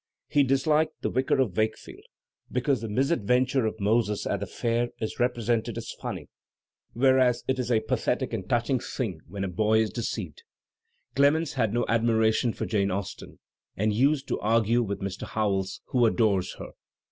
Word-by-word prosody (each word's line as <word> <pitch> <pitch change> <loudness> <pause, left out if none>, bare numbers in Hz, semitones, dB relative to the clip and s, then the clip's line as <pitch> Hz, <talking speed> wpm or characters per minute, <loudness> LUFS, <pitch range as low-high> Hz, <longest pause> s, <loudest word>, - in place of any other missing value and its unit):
He 145 - +3
disliked 150 +4 +2
"The - - 0
Vicar 130 +1 +1
of 115 -9 +1
Wakefield," 110 0 -2 0.5
because 125 -1 0
the 115 - -4
misadventm^ 125 0 +1
of 110 - -5
Moses 105 0 +1
at - - -1
the - - -4
fair 120 0 -1
is 110 - -4
represented 120 -2 0
as - - -5
fumiy, - - -5 0.7
whereas 130 -1 +3
it 130 0 0
is 125 0 -2
a 110 -2 +3
pathetic 125 +2 -1
and 95 -5 -4
touching 120 +2 +1
thing 105 - -4
when 100 +3 -5
a - - -1
boy 105 +4 +2
is 110 -1 +1
deceived. 120 - -4 0.7
Clemens 145 +2 +3
had 115 -6 +1
no 120 +2 0
admiration 115 0 +2
for - - -4
Jane 100 -3 +1
Austen 95 0 -5 0.4
and 105 +1 +1
used 135 +5 +2
to - - -1
argue 115 +2 +2
with 100 -3 -3
Mr. 95 -1 -5
Howells, 95 -3 -1
who 120 -2 +3
adores 105 -5 +1
her. - - -8
115 Hz, 170 wpm, -27 LUFS, 105-130 Hz, 0.7 s, He